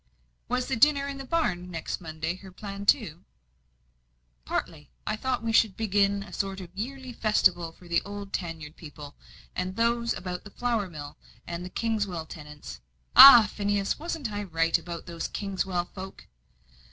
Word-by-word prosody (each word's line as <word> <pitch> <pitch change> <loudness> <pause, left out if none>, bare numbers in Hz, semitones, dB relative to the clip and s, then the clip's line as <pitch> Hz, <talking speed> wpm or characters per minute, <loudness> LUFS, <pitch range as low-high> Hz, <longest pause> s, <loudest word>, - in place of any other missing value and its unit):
"Was 250 +1 0
the 265 - -1
dinner 280 +3 +4
in 275 -1 -5
the 270 - -6
barn, 185 - -1
next 165 0 -4
Monday, 160 0 -3
her 190 0 -12
plan, 200 +1 -7
too?" 185 - +2 1.2
"Partly. 150 -3 -4 0.2
I 215 - -1
thought 250 +2 -2
we 225 -1 -1
would 215 -4 -7
begin 200 -2 +1
a - - -13
sort 195 -1 -2
of 180 -2 -9
yearly 260 +4 -5
festival 185 -7 +2
for 175 +2 -17
the 170 -1 +2
old 200 -1 -8
tan 165 -3 -3
yard 150 +1 -9
people, 145 -2 -10 0.4
and 185 +1 -3
those 235 +1 +1
about 180 -1 -5
the 205 - -10
flour 230 -3 -1
mill, 145 -3 -9 0.3
and 170 0 -5
the 180 - -6
Kingswell 205 -7 -2
tenants 150 - -10 0.3
ah, 245 -5 +12
Phineas, 205 -1 0
wasn't 310 -7 -4
I 205 0 -3
right 165 -4 +1
about 170 -2 -3
those 170 -1 -4
Kingswell 190 -3 -2
folk?" 190 0 -9
195 Hz, 165 wpm, -27 LUFS, 170-225 Hz, 1.2 s, ah